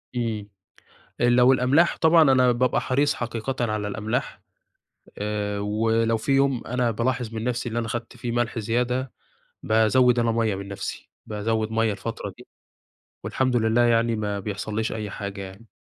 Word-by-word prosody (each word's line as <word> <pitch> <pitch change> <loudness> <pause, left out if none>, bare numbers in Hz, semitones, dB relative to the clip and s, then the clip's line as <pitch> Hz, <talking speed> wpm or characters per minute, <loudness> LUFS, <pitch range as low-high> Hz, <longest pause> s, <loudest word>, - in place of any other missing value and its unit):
امم. 110 -4 -2 0.7
لو 125 +2 +5
الأملاح 135 +7 +3
طبعًا 165 0 +5
أنا 125 -1 +4
بابقى 125 +1 +1
حريص 145 +3 +1
حقيقةً 120 +2 -4 0.2
على 105 -1 -2
الأملاح. 110 +2 -3 0.8
آآ، 105 -1 -2
ولو 115 +2 +1
في 125 +5 -3
يوم 135 -2 +2
أنا 125 0 0
بالاحظ 120 0 -2
من 110 - -3
نفسي 125 0 -2
اللي 115 - -2
أنا 115 - -3
أخدت 115 0 -5
فيه 120 - -4
ملح 120 -1 -1
زيادة، 125 +3 -1 0.5
بازود 120 +3 +3
أنا 115 -1 +2
مَيَّة 115 -3 +1
من 100 +1 -7
نفسي، 100 - -6 0.2
بازود 110 +1 -1
مَيَّة 115 -1 +1
الفترة - - -5
دي. - - -14 0.8
والحمد 130 -2 0
لله 110 +1 +3
يعني 115 -1 +2
ما 105 -2 -2
بيحصليش 105 +2 -3
أي 105 -2 -4
حاجة 100 0 -6
يعني. 95 +4 -11
115 Hz, 155 wpm, -24 LUFS, 110-125 Hz, 0.8 s, لو